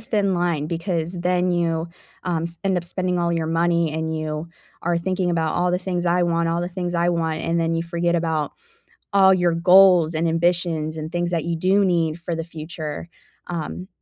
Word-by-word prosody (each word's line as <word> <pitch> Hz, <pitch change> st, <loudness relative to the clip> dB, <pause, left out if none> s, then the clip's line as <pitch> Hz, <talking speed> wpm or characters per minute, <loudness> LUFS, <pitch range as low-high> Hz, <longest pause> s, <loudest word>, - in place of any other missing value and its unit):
thin 200 Hz, -3 st, 0 dB
line 170 Hz, -4 st, 0 dB
because 170 Hz, 0 st, -2 dB
then 180 Hz, +1 st, +1 dB
you, 165 Hz, -1 st, 0 dB, 0.4 s
um, 170 Hz, -3 st, -1 dB
s 170 Hz, 0 st, -7 dB
end 190 Hz, -1 st, +2 dB
up 175 Hz, -, -2 dB
spending 180 Hz, +1 st, -2 dB
all 170 Hz, 0 st, +1 dB
your 165 Hz, -1 st, -1 dB
money 170 Hz, 0 st, +1 dB
and 160 Hz, 0 st, -2 dB
you 155 Hz, +1 st, -4 dB, 0.3 s
are 170 Hz, 0 st, +1 dB
thinking 185 Hz, +1 st, -1 dB
about 160 Hz, -2 st, 0 dB
"all 180 Hz, 0 st, +1 dB
the 180 Hz, -, +1 dB
things 180 Hz, -1 st, -3 dB
I 175 Hz, +1 st, +2 dB
want, 170 Hz, -1 st, +1 dB
all 165 Hz, +1 st, 0 dB
the 175 Hz, -, -2 dB
things 180 Hz, -1 st, -4 dB
I 170 Hz, 0 st, +2 dB
want," 165 Hz, -2 st, 0 dB
and 165 Hz, +1 st, 0 dB
then 165 Hz, 0 st, 0 dB
you 165 Hz, -, 0 dB
forget 170 Hz, 0 st, -1 dB
about 160 Hz, -3 st, -1 dB, 0.6 s
all 190 Hz, -1 st, +6 dB
your 175 Hz, -2 st, +2 dB
goals 180 Hz, -1 st, +6 dB
and 165 Hz, +1 st, +1 dB
ambitions 165 Hz, -2 st, 0 dB
and 155 Hz, 0 st, -5 dB
things 175 Hz, 0 st, -1 dB
that 165 Hz, -2 st, 0 dB
you 170 Hz, 0 st, -1 dB
do 190 Hz, +4 st, +3 dB
need 170 Hz, -3 st, +1 dB
for 170 Hz, 0 st, -3 dB
the 165 Hz, 0 st, -3 dB
future, 160 Hz, -1 st, -7 dB, 0.4 s
um, 175 Hz, +2 st, -5 dB
170 Hz, 205 wpm, -22 LUFS, 165-180 Hz, 0.6 s, all